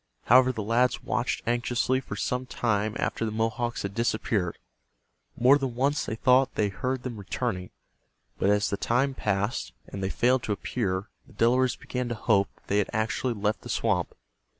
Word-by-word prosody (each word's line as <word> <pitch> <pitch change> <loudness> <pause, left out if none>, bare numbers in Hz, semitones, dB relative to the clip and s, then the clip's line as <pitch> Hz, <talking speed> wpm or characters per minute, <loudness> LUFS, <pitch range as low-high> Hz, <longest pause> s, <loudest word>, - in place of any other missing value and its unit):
However, 130 +2 +6
the 110 -4 -4
lads 120 +4 +1
watched 120 +1 -1
anxiously 120 +2 +1
for 115 -6 -7
some 125 +5 -2
time 110 -3 0
after - - -1
the 110 - 0
Mohawks 115 +2 -1
had 100 0 -4
disappeared. 110 -5 0 0.8
More 135 +4 +6
than 130 -4 -3
once 140 +3 +1
they 110 - -2
thought 130 +3 +3
they 105 -1 +1
heard 125 +6 -3
them 120 -3 -5
returning, 100 -2 -3 0.7
but 100 - +2
as 105 +1 +2
the 100 - 0
time 130 +6 +1
passed 105 -2 -1
and 100 - -7
they 95 - -1
failed 125 +5 +2
to 105 - 0
appear 100 -2 -2 0.2
the 135 - -18
Delawares 120 +4 +3
began 125 -1 -4
to 120 - -2
hope 100 -3 +2
that - - -30
they 100 - 0
had 100 - 0
actually 110 +3 -1
left 105 +1 -1
the - - -10
swamp. - - 0
115 Hz, 180 wpm, -27 LUFS, 105-125 Hz, 0.8 s, However